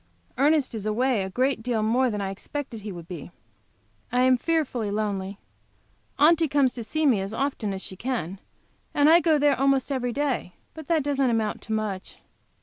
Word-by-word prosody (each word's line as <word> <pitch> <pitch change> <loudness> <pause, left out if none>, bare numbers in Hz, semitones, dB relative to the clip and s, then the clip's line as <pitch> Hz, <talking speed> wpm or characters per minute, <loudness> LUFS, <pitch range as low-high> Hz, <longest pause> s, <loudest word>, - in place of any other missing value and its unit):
Ernest 290 -1 +3
is 215 -2 -4
away 240 +1 +1
a 190 - -3
great 255 +4 0
deal 225 -2 -1
more 245 +4 +2
than 210 -2 -3
I 195 -1 -2
expected 240 +3 -6
he 205 0 -6
would 170 -2 -9
be. 175 -3 -7 0.8
I 250 +1 +3
am 255 0 +5
fearfully 255 -6 -1
lonely. 200 -2 -2 0.8
Aunty 325 +2 +5
comes 280 -3 +2
to 235 - -6
see 310 +7 -1
me 240 -9 +4
as 195 +3 -5
often 265 -6 -1
as 190 0 -5
she 190 - -6
can, 195 -5 -3 0.6
and 290 0 +5
I 330 +2 +8
go 320 -2 +3
there 290 -2 +3
almost 275 0 +2
every 250 -2 -1
day, 270 -9 -2 0.2
but 315 -2 -10
that 325 -4 +2
doesn't 275 -2 +1
amount 220 -2 -1
to 220 - -5
much. 210 -3 -3
245 Hz, 190 wpm, -25 LUFS, 210-280 Hz, 0.8 s, I